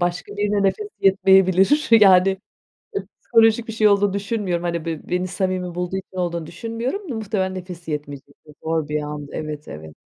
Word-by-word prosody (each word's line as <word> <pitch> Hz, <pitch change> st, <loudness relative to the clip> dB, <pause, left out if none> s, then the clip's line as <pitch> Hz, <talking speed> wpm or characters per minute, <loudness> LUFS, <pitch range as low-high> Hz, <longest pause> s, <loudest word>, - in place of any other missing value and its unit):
başka 175 Hz, +3 st, -2 dB
birine 205 Hz, 0 st, +1 dB
nefesi 410 Hz, -, 0 dB
yetmeyebilir, 190 Hz, -, +4 dB
yani 195 Hz, -3 st, +6 dB, 0.6 s
ı -, -, -4 dB, 0.2 s
psikolojik 225 Hz, 0 st, +3 dB
bir 225 Hz, -, -5 dB
şey 215 Hz, -1 st, +3 dB
olduğunu 200 Hz, -1 st, +3 dB
düşünmüyorum. 200 Hz, -4 st, -2 dB
Hani, 170 Hz, -1 st, -2 dB
be 165 Hz, -2 st, -5 dB
beni 180 Hz, +1 st, 0 dB
samimi 185 Hz, -1 st, -2 dB
bulduğu 180 Hz, +1 st, -2 dB
için 190 Hz, -1 st, -9 dB
olduğunu 170 Hz, -2 st, -2 dB
düşünmüyorum. 230 Hz, -, -4 dB
Muhtemelen 190 Hz, -3 st, -2 dB
nefes 180 Hz, -2 st, -8 dB
yetmeyecekti. 145 Hz, 0 st, -7 dB
Zor 160 Hz, -2 st, -1 dB
bir 150 Hz, 0 st, -1 dB
andı. 150 Hz, -1 st, -7 dB
Evet, 150 Hz, -1 st, -6 dB
evet. 80 Hz, 0 st, -10 dB
185 Hz, 160 wpm, -21 LUFS, 170-205 Hz, 0.6 s, yani